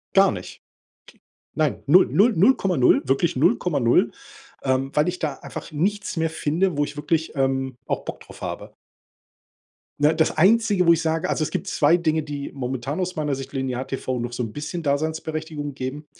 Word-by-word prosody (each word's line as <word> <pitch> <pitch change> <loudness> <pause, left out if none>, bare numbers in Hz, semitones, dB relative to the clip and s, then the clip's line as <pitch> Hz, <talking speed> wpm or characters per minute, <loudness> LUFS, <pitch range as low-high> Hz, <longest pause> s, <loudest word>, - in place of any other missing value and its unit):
Gar 195 0 +6
nicht. 90 -3 -7
K - - -42 1.0
nein, 155 -2 0
0, 175 +7 +6
0, 225 +5 +4
0,0, 185 - +4
wirklich 135 +5 +1
0,0, 130 -1 +2 0.5
ähm, 130 0 0
weil 150 +3 +3
ich 180 0 -3
da 150 -4 -2
einfach - - -8
nichts 200 +6 -1
mehr 160 0 0
finde, 160 +2 0
wo 145 - +3
ich 145 - -8
wirklich, 160 +2 -1
ähm, 135 -2 -1
auch - - -2
Bock - - -7
drauf - - -14
habe. - - -6 1.3
Ne, 150 +2 +4
das 160 0 +1
Einzige, 200 +1 +4
wo 170 - +7
ich 165 - 0
sage 160 0 -1
also, - - -1
es - - -3
gibt - - -3
2 150 +3 +3
Dinge, 160 -2 +1
die 145 -2 -6
momentan 130 +3 -4
aus 185 0 -2
meiner 150 -2 -1
Sicht 135 0 -6
Linear-TV 130 -1 -3
noch 120 0 -4
so 120 - -2
'n 115 - -5
bisschen 150 +6 -5
Daseinsberechtigung 155 0 -2
geben. 135 +3 -5
150 Hz, 180 wpm, -23 LUFS, 135-165 Hz, 1.3 s, wo